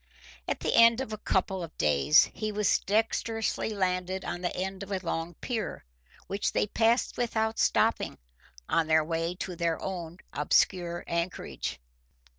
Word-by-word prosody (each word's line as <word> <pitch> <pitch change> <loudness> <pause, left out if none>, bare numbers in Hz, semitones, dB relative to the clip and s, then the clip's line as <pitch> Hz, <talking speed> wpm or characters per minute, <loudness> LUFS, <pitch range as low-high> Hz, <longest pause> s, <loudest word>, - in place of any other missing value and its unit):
At - - -2
the - - 0
end 230 +1 +7
of 265 -5 -4
a - - -3
couple 190 -1 0
of 165 -2 -8
days 75 - +5
he 215 -1 -3
was 210 -1 +2
dexterously 225 +2 0
landed 185 -2 -1
on 175 - -4
the 175 - -2
end 190 +1 -3
of 200 0 -7
a 195 - +1
long 165 -2 -3
pier, 235 -4 -3 0.4
which 200 +1 -2
they - - +2
passed 230 +3 +1
without 220 -2 0
stopping, - - +2 0.5
on 165 -1 +2
their 160 0 +4
way 165 +2 -2
to 180 0 -5
their 170 -1 0
own 175 -3 -5 0.2
obscure 175 -2 +1
anchorage. 170 +2 -3
185 Hz, 155 wpm, -29 LUFS, 170-215 Hz, 0.5 s, end